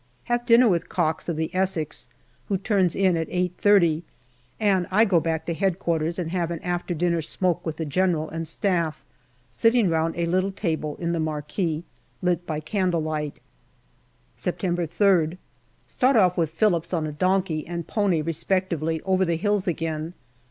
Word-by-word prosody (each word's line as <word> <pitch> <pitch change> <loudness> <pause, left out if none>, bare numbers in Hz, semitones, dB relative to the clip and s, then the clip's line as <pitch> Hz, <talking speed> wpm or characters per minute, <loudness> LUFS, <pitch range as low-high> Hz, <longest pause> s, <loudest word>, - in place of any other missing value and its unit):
Have 240 0 -1
dinner 240 +1 +7
with 175 -5 +1
Cox, 160 -1 -1
of 170 - -1
the 160 0 -3
Essex, 185 -5 -2 0.4
who 195 - 0
turns 190 -3 +1
in 190 -2 +3
at 165 -1 -2
8.30, 180 -2 +3 0.6
and 195 -4 +2
I 210 +4 +4
go 185 -5 +3
back 160 0 -2
to 170 - -1
Headquarters 170 -3 0
and 170 -3 -3
have 175 -2 -1
an 170 - -3
after 175 0 -2
dinner 170 0 +1
smoke 175 +2 -1
with 160 -2 -4
the 160 - -3
General 160 +1 +1
and 165 +1 -5
Staff, 165 -2 -1 0.5
sitting 230 -3 +3
round 165 0 0
a 170 - 0
little 185 +3 +1
table 160 -6 -2
in 170 -1 -2
the 170 - -1
marquee 155 +2 -2 0.4
lit 175 -1 0
by 155 -2 -2
candle 180 -1 0
light. 150 -2 -3 0.9
September 175 -1 -2
3rd. 175 -2 +2 0.5
Start 260 +1 +2
off 185 -5 +4
with 165 -4 +1
Phillips 170 0 +1
on 160 -2 -1
a 155 - -3
donkey 180 0 0
and 170 -1 -4
pony 190 -5 +1
respec 185 +4 0
tively 160 0 -1
over 190 0 +2
the 170 -2 0
hills 205 +2 0
again. 165 0 -2
170 Hz, 170 wpm, -24 LUFS, 160-190 Hz, 0.9 s, dinner